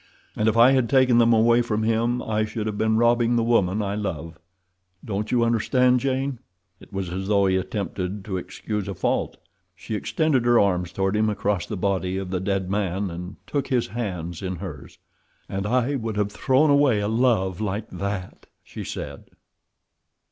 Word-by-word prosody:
"And 110 +1 +2
if 110 - -1
I 120 +3 +7
had 130 -4 +2
taken 130 -2 +4
them 115 0 +5
away 115 +1 +4
from 110 -2 -1
him 115 +2 +1
I 110 0 0
should 110 0 -4
have 110 -1 -2
been 110 +1 +1
robbing 120 0 +3
the 115 - +2
woman 105 -3 +2
I 100 0 -2
love—don't 95 +2 -7
you 120 -1 +3
understand, 125 +2 +3
Jane?" 135 -1 -1 0.4
It - - -17
was 95 -3 -4
as 95 +2 -4
though 100 -1 +3
he 95 -1 +2
attempted 95 0 -3
to 95 -3 -3
excuse 100 +3 -4
a 100 - -4
fault. - - -1 0.4
She 90 +6 -7
extended 140 +4 +1
her 120 -1 +5
arms 90 -3 +1
toward 95 +2 0
him 110 0 +2
across 100 -3 -1
the 105 - -4
body 95 -1 -1
of 95 -1 -5
the 95 - -1
dead 95 0 -1
man, 95 -1 -1
and 90 +3 -7
took 140 -2 -2
his 125 -6 0
hands 90 -7 -4
in 95 -1 -3
hers. 85 -5 -9 0.5
"And 95 +1 -3
I 125 +4 +1
would 115 -5 -3
have 105 -1 0
thrown 130 +8 +3
away 140 -6 +4
a 100 - -1
love 110 -5 +1
like 105 +1 -2
that!" 100 -2 -5 0.2
she - - -8
said. - - -7
105 Hz, 185 wpm, -24 LUFS, 95-120 Hz, 0.5 s, I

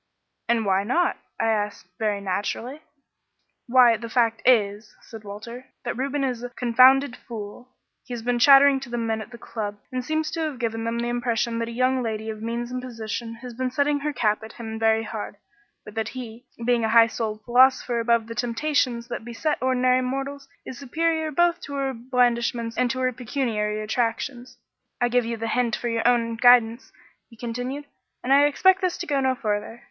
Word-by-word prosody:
"'And 230 -2 +2
why 195 0 +2
not?' 295 +12 +1 0.2
I 225 - +1
asked 210 -2 -2
very 210 -2 0
naturally. 210 +8 -3 0.9
"'Why, 240 -2 +6
the 230 +1 -7
fact 230 -1 +1
is,' 210 -3 +2
said 225 -2 -12
Walter, 235 +5 -9 0.2
'that 240 - -2
Reuben 275 +3 -2
is 250 -3 -2
a 245 - -5
confounded 255 +2 +4
fool. 230 +2 -9 0.3
He 245 - -6
has 230 - -7
been 245 0 0
chattering 275 +2 +7
to 265 -2 -9
the 240 - -3
men 225 -1 -1
at - - -9
the 235 - -11
club 210 -3 -5
and 255 0 -3
seems 310 +3 -1
to 330 - -4
have 310 -4 -2
given 225 -2 -3
them 230 0 -2
the 235 0 -2
impression 235 -1 -1
that 230 - -2
a - - -6
young 255 +2 +1
lady 220 -1 -3
of 215 0 -9
means 235 +2 -3
and 255 0 -3
position 230 -1 -5
has 250 -1 -7
been 255 +2 -2
setting 285 +3 +1
her 300 +1 -2
cap 215 -6 0
at 220 0 -10
him 220 -1 -7
very 225 0 +2
hard, 215 -2 -6 0.5
but 210 - -10
that 220 0 -2
he, 240 0 -8 0.2
being 240 -1 +2
a 220 - +1
high 230 0 +7
souled 220 -1 -4
philosopher 250 -1 +4
above 230 -1 +2
the 230 - -7
temptations 240 0 -1
that 240 -2 -5
beset 240 +6 -2
ordinary 255 0 +2
mortals, 275 +2 -4 0.2
is 260 - -8
superior 320 +3 -1
both 345 +3 +2
to 280 - -7
her 270 -1 -1
blandishments 235 -1 0
and 250 -1 +1
her 255 0 -1
pecuniary 225 -4 -2
attractions. 245 +3 -3 0.4
I 245 -1 +2
give 245 -1 +2
you 230 0 -3
the 225 +1 -3
hint 240 -3 +1
for 240 - -3
your 230 0 0
own 230 -2 +2
guidance,' 240 0 +4 0.4
he 230 - -17
continued, 250 +5 -5 0.4
'and 265 - +2
I 285 +1 +6
expect 375 +6 +3
this 365 -2 0
to 350 - -5
go 285 -4 0
no 260 -1 +1
farther. 215 -1 -3
240 Hz, 195 wpm, -24 LUFS, 225-260 Hz, 0.9 s, chattering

